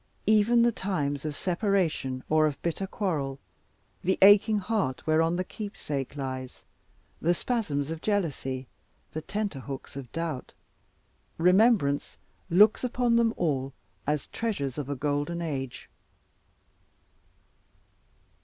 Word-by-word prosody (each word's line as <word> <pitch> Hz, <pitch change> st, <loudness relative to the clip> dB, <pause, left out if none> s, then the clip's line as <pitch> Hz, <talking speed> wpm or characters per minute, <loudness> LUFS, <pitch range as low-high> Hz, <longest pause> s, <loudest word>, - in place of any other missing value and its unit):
Even 220 Hz, +3 st, +5 dB
the 240 Hz, -, +4 dB
times 145 Hz, -, -2 dB
of 150 Hz, -2 st, -3 dB
separation 175 Hz, -, 0 dB
or 155 Hz, 0 st, +4 dB
of 145 Hz, -, -4 dB
bitter 175 Hz, +3 st, -1 dB
quarrel, 150 Hz, -10 st, -2 dB, 0.7 s
the 190 Hz, +2 st, +2 dB
aching 210 Hz, +2 st, +7 dB
heart 200 Hz, -, -1 dB
whereon 165 Hz, +2 st, +3 dB
the 185 Hz, -, 0 dB
keepsake 150 Hz, -, -5 dB
lies, 130 Hz, -2 st, -5 dB, 0.6 s
the 175 Hz, +2 st, +3 dB
spasms 160 Hz, -, -1 dB
of 165 Hz, -1 st, -5 dB
jealousy, 145 Hz, -10 st, -1 dB, 0.5 s
the 155 Hz, -, -4 dB
tenterhooks 150 Hz, -11 st, -5 dB
of 135 Hz, -4 st, -7 dB
doubt; 165 Hz, -6 st, -4 dB, 0.8 s
remembrance 180 Hz, -5 st, +3 dB, 0.3 s
looks 205 Hz, +8 st, +5 dB
upon 245 Hz, -1 st, +1 dB
them 235 Hz, -1 st, +4 dB
all 135 Hz, -5 st, -1 dB, 0.3 s
as 150 Hz, -2 st, 0 dB
treasures 150 Hz, -, -3 dB
of 140 Hz, -2 st, -5 dB
a 145 Hz, -, -1 dB
golden 145 Hz, +4 st, -1 dB
age. 135 Hz, -6 st, -4 dB
165 Hz, 115 wpm, -28 LUFS, 140-205 Hz, 0.8 s, aching